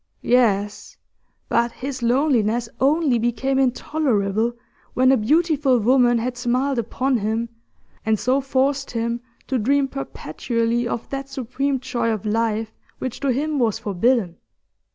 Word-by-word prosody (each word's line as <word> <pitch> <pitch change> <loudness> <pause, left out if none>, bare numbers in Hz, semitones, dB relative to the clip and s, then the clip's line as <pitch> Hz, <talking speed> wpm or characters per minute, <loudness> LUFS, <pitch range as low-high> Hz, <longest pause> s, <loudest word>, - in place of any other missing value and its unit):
Yes, 210 -5 +1 0.5
but 235 0 +1
his 265 0 -5
loneliness 240 -2 +2
only 280 -2 +3
became 265 +4 0
intolerable 240 -5 0 0.4
when 255 +1 +5
a 270 - +5
beautiful 295 +2 +2
woman 240 +1 +4
had 245 +2 -2
smiled 250 +2 0
upon 255 +3 0
him, 220 +3 -1 0.5
and 220 0 +2
so 255 +6 +1
forced 270 +1 0
him 235 0 -2 0.2
to 260 -1 -1
dream 275 +5 +2
perpetually 240 -3 -2
of 235 - -4
that 275 0 -4
supreme 265 +2 -2
joy 240 -2 -2
of 220 -1 -2
life 220 0 -1 0.2
which 255 -2 -5
to 275 -2 +1
him 295 +3 -1
was 225 -4 +1
forbidden. 205 -2 0
245 Hz, 135 wpm, -22 LUFS, 230-270 Hz, 0.5 s, when